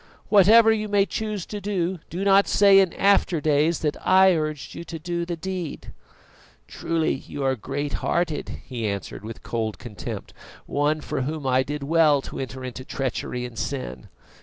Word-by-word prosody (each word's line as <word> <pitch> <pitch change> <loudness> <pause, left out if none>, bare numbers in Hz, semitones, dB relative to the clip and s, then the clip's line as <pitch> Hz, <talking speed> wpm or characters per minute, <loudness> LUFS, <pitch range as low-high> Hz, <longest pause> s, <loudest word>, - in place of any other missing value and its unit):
Whatever 220 +3 +7
you 215 -1 0
may 200 -1 +3
choose 210 0 -4
to 205 -1 -6
do, 190 -3 -1
do 180 +3 -4
not 200 0 +5
say 200 -1 +6
in 190 -3 +3
after 195 -4 +3
days 150 +2 +2
that 150 -2 0
I 190 0 +6
urged 155 -2 -3
you - - -7
to 165 -1 -7 0.3
the 175 - -2
deed." 180 -2 -6 0.7
"Truly 165 -1 -1
you 135 +1 -6
are 135 0 +2
great 140 +5 -4
hearted!" 170 -3 -2
he 120 -4 -3
answered, 100 -1 -5
with 110 +1 -8
cold 110 -2 -3
contempt; 110 -5 -7 0.3
"one 150 +2 0
for - - -3
whom 150 +2 -4
I 130 0 +3
did 145 +2 -4
well 155 -1 +4
to - - -7
enter 130 0 -6
into 130 +1 -6
treachery 125 -2 -3
and 120 -3 -8
sin! - - -4
155 Hz, 170 wpm, -24 LUFS, 130-190 Hz, 0.7 s, Whatever